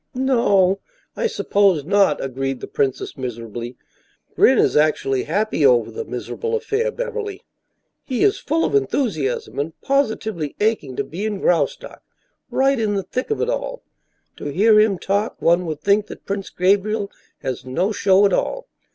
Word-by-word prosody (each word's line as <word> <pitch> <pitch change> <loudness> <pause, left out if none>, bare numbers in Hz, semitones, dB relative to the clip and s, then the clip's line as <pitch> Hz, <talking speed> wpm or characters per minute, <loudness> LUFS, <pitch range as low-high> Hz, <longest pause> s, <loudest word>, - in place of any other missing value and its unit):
"No 230 -8 +3 0.4
I 470 - 0
suppose 195 - +2
not," 195 -4 +3
agreed 135 0 -3
the - - -6
princess, 135 -2 -2
miserably. 120 -1 -6 0.6
"Gren - - +5
is - - +3
actually 150 -3 +2
happy 200 0 0
over 125 -4 +4
the 460 - -5
miserable 460 +1 -4
affair, 460 +2 -1
Beverly. 455 -4 -5 0.6
He 255 -3 -1
is 410 0 +3
full 325 +3 0
of - - -2
enthusiasm 210 - -1
and 160 +3 -4
positively 220 - -1
aching 205 - 0
to - - -1
be 180 +6 -6
in 215 -2 -2
Graustark 165 -7 0 0.5
right 270 -1 +2
in 210 -2 0
the 195 - -1
thick 255 - -4
of 435 - -1
it 470 - 0
all. - - -3 0.5
To - - -8
hear 210 +9 +4
him 215 -3 +3
talk, 200 +5 -1
one 170 +1 +2
would 155 -2 -4
think 205 +4 +2
that - - -11
Prince 200 -1 -4
Gabriel 200 +3 +1 0.3
has 130 0 -3
no 170 - -1
show 200 -1 +4
at 195 - +2
all. - - -1
200 Hz, 160 wpm, -21 LUFS, -, 0.6 s, Gren